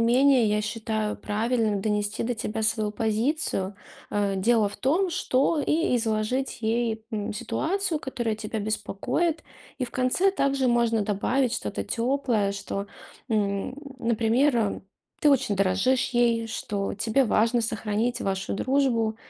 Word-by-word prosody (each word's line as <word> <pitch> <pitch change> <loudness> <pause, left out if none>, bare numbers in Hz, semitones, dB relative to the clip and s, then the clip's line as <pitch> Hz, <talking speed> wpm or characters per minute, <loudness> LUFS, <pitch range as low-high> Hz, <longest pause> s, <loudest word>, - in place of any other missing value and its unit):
менее, 250 +2 +5
я 210 0 +1
считаю 215 -1 -2
правильным 220 -1 0
донести 210 0 -1
до 245 +1 -1
тебя 220 0 -3
свою 215 -1 +1
позицию, 220 -2 -1 0.4
а. 200 -1 0
Дело 215 +1 +3
в - - -10
том, 345 +8 +1
что, 295 -1 +1
и 305 -4 +1
изложить 225 +3 -1
ей, 225 0 0
м, 210 -1 -3
ситуацию, 325 - -1
которая 240 -6 -3
тебя 220 0 -4
беспокоит. 220 - -1 0.4
И 255 - 0
в 235 - -9
конце 255 +10 +2
также 275 -7 +1
можно 235 -2 +2
добавить 230 +5 0
что-то - - -3
теплое, 235 -4 0
что, 200 0 -4 0.4
м, 205 0 0 0.2
например, 235 +4 +2
э, 215 -3 0 0.4
ты 295 - +5
очень 260 -7 +2
дорожишь 195 +7 +2
ей, 235 -2 +2
что 200 -3 -3
тебе 225 +6 +2
важно 230 +2 +2
сохранить 225 +2 -1
вашу 195 -1 -2
дружбу, 235 -2 +1
225 Hz, 135 wpm, -26 LUFS, 210-255 Hz, 0.4 s, менее